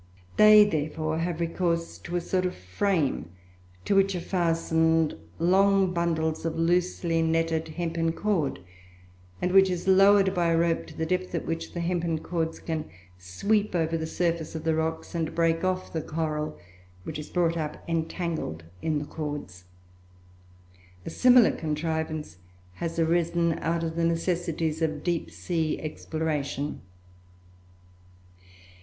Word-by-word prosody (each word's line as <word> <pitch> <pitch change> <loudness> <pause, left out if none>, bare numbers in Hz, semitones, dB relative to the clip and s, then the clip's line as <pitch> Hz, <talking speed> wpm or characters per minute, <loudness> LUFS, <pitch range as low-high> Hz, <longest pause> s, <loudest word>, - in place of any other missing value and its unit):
They, 215 0 +8
therefore, 155 -2 -2
have 170 0 -2
recourse 170 0 -1
to 175 - -6
a 175 - +1
sort 185 +1 0
of 180 - -5
frame, 130 - -1 0.6
to - - +2
which 195 -1 +3
are - - -1
fastened 165 -2 +1 0.2
long 190 +2 +3
bundles 160 -2 0
of 165 -1 -2
loosely 170 0 +1
netted 165 0 +1
hempen 165 0 -1
cord, 170 -5 0 0.9
and 180 - +1
which 190 0 +6
is 180 0 -3
lowered 195 0 +6
by 175 -1 +1
a 165 0 +3
rope 170 0 +1
to 160 - -13
the 160 - -1
depth 185 +1 -1
at 170 - -2
which 165 0 -4
the 170 - -2
hempen 170 -1 0
cords 165 0 -3
can 160 -2 -3 0.3
sweep 200 - 0
over 165 -1 +1
the 160 -1 -2
surface 165 -1 -1
of 160 - -4
the 160 - +1
rocks 160 +2 -2
and 165 -2 -2
break 165 0 +2
off 185 0 -1
the 160 - -1
coral, 155 -1 -3 0.5
which - - -5
is 150 - -8
brought 170 -2 +1
up 155 -2 -4
entangled 165 - -3 0.2
in 155 -2 0
the 145 - -3
cords. 145 - -6 1.4
A - - -5
similar 250 +4 +6
contrivance 155 - -3 0.4
has 165 - -4
arisen 170 0 +1
out 165 +1 -1
of 160 -1 -3
the 165 0 +1
necessities 165 -1 -1
of 155 -2 -1
deep 175 -2 -1
sea 160 -3 -2
exploration. 155 -2 -3
165 Hz, 145 wpm, -27 LUFS, 160-175 Hz, 1.4 s, They